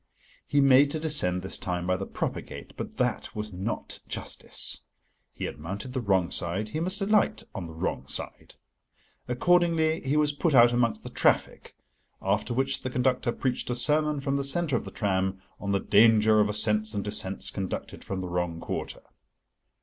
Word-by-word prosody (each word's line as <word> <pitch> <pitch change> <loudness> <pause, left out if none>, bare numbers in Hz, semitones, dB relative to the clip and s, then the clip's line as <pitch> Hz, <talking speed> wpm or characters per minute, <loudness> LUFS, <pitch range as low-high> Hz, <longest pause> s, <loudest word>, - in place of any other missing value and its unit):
He 145 - +3
made 135 +1 +6
to 155 - -2
descend 120 - +1
this 95 - -2
time 90 -1 -3
by 90 0 +1
the 95 +1 -4
proper - - -3
gate, - - -10
but - - -7
that - - -1
was 105 -1 -4
not 95 +5 -4
justice. - - -2 0.5
He - - -5
had - - -6
mounted 100 +10 -6
the 130 - -1
wrong 95 -5 +1
side, 95 +5 -1
he 155 - -3
must 185 +4 +1
alight 210 +1 +2
on 95 -5 -5
the 80 - -10
wrong 80 - -3
side. - - -2 0.7
Accordingly, 165 +4 +2
he 140 +3 0
was 150 -1 +3
put 150 +1 0
out 120 -1 +7
amongst 120 -2 +1
the - - -8
traffic, - - +1 0.4
after 100 +5 -1
which 135 +2 0
the 130 - -3
conductor 125 -1 +1
preached 125 +1 -2
a 125 - 0
sermon 150 +3 +1
from 140 0 -1
the 140 - -1
centre 145 +1 +1
of - - -2
the - - -6
tram 95 -1 -1 0.2
on 100 - -3
the 100 - +2
danger 110 +1 +5
of 105 0 +3
ascents 105 +1 +1
and 100 - -1
descents 100 -2 -2
conducted 95 -2 -5
from 95 -1 -4
the 90 - -4
wrong 85 -1 -2
quarter. - - -5
115 Hz, 185 wpm, -27 LUFS, 95-140 Hz, 0.7 s, out